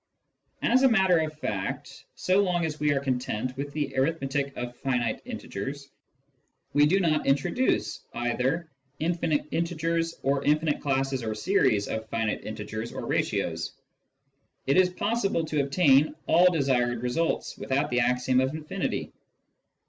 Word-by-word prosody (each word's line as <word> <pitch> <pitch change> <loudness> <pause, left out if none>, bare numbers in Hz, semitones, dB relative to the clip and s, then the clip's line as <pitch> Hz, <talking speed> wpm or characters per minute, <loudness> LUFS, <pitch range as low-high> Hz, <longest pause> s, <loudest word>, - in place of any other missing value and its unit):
As 255 +2 +4
a 265 - +6
matter 190 -6 +4
of 155 -1 -3
fact, 95 -9 -4
so 185 +2 +2
long 175 -3 +1
as 150 -1 -4
we 150 0 +2
are 140 - +2
content 130 -2 -2
with 140 +2 -4
the 145 -2 -3
arith 155 +5 +1
metic 140 +1 -2
of 125 0 -5
finite 125 -4 -1
integers, 140 +7 -6 0.8
and 145 0 +5
do 190 +4 +3
not 155 -5 +1
introduce 135 - +1
either 125 +7 -1 0.3
infinite 165 -2 0
integers 165 0 -1
or 140 +1 +1
infinite 150 +1 +1
classes 135 -1 0
or 110 -2 -3
series 110 - +2
of 110 0 -4
finite 115 -1 -1
integers 110 +1 -5
or - - -6
ratios, - - -1 0.9
it 135 - +2
is 185 -1 +5
possible 195 -3 0
to 155 -2 0
obtain 140 0 +4
all 180 +2 +5
desired 125 -6 +1
results 160 +7 -1
without 140 +2 -1
the 125 - +2
axiom 125 +1 +2
of 130 +3 0
infinity. 155 -1 -3
140 Hz, 145 wpm, -27 LUFS, 125-165 Hz, 0.9 s, a